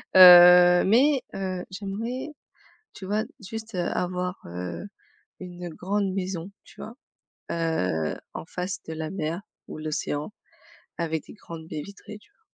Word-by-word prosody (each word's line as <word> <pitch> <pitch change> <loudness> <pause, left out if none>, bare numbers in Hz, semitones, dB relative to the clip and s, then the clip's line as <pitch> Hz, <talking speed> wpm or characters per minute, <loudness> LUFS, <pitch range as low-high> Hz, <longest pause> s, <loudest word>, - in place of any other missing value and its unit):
Heu, 180 -1 +10
mais, 260 +7 +4
heu, 185 -2 -3
j'aimerais, 220 +8 -4 0.7
tu 195 - -10
vois, 210 +3 0 0.2
juste, 220 +2 -8
heu, 180 - -1
avoir, 180 +1 -2
heu, 90 - -6 0.6
une 180 -1 -7
grande 195 +4 -2
maison, 185 -1 -4
tu - - -14
vois? 225 - -8 0.6
Heu, 95 - -1 0.2
en - - -6
face 180 +2 -5
de 160 - -5
la 160 0 -4
mer 165 0 -3 0.3
ou - - -8
l'océan, 155 0 -3 0.7
avec 160 -2 -2
des - - -11
grandes 165 -6 -10
baies 155 -2 -5
vitrées, 200 +3 -11
tu 210 - -26
vois? - - -42
180 Hz, 145 wpm, -26 LUFS, 160-200 Hz, 0.7 s, Heu